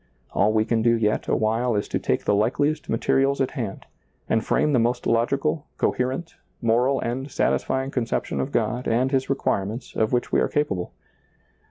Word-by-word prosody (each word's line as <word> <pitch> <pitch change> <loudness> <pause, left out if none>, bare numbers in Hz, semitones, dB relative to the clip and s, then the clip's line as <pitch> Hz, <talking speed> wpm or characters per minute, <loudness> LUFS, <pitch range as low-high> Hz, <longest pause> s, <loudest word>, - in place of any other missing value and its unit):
All 105 +2 +2
we 110 0 +2
can 115 0 +1
do 115 +1 +3
yet 105 -1 0
a - - +2
while 115 +2 +1
is 100 - -1
to - - -1
take - - -1
the - - +3
likeliest 145 +9 +1
materials 135 +4 +2
at 135 - 0
hand, 115 -9 -5 0.4
and 110 0 +1
frame 150 - +1
the 125 - +4
most 120 +2 0
logical, 140 +6 +1
coherent, 130 +7 -1 0.2
moral, 125 +4 +2
and 130 +4 -3
satisfying 130 0 0
con 125 -4 -1
ception 70 -10 -2
of - - -3
God 120 +3 -1
and 125 +3 +1
His 135 -1 0
requirements 110 -4 -2
of 110 -1 +1
which 120 -1 0
we - - +3
are - - +2
capable. 100 -12 -1
120 Hz, 185 wpm, -24 LUFS, 110-135 Hz, 0.4 s, the